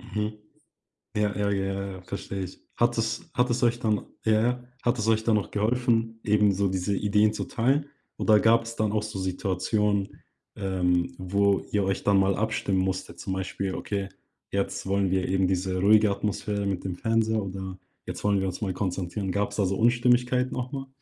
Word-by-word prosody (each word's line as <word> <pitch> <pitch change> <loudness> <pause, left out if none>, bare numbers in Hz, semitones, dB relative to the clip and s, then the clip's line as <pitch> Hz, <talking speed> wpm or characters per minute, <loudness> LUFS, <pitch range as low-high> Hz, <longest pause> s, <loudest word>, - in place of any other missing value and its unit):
Mhm. 105 0 -3 0.8
Ja, 105 -1 +1
ja, 100 0 0
ja, 95 0 0
ja, 100 0 -4
ja, 95 - -9
verstehe 100 +1 -5
ich. 90 - -9 0.2
Hat - - +2
es - - -2
hat 125 +1 +2
es 120 0 0
euch 120 0 +3
dann 110 -4 0 0.2
ja, 110 -1 +3
ja. 125 +2 0 0.2
Hat 120 +1 +1
es 110 - -1
euch 110 -1 +3
dann 110 -1 +3
noch 105 - -1
geholfen, 115 +1 +1
eben 105 -1 +4
so 100 +1 +1
diese 95 +2 -1
Ideen 105 +2 +3
zu - - -3
teilen 135 +5 +1 0.3
oder 105 -1 +4
gab's 115 +1 +3
dann 110 -2 0
auch 105 0 0
so 105 -3 -5
Situationen, 95 +2 -1 0.3
ähm, 90 -3 0
wo 100 +1 +2
ihr 105 -1 +2
euch 95 0 -1
dann 100 -1 +4
mal 95 0 +3
abstimmen 100 -2 0
musstet? 95 -2 -2
Zum 95 - -3
Beispiel: 95 0 -3
„Okay, 100 -1 -3 0.4
jetzt 100 -1 -2
wollen 100 0 +1
wir 95 -1 +1
eben 95 0 +2
diese 95 0 -1
ruhige 105 +1 +5
Atmosphäre 100 0 -2
mit 95 -2 -2
dem 95 -2 -3
Fernseher“, 110 +1 +1
oder 95 -1 -6 0.3
„Jetzt - - -6
wollen 100 -1 +3
wir 95 - 0
uns 90 +2 -5
mal 95 -3 -1
konzentrieren.“ 95 +1 -2
Gab's 100 +1 -1
da 100 - +2
so 95 +1 0
Unstimmigkeiten 125 +2 +3
auch 125 0 -3
mal? 135 -2 -5
100 Hz, 195 wpm, -27 LUFS, 95-110 Hz, 0.8 s, ruhige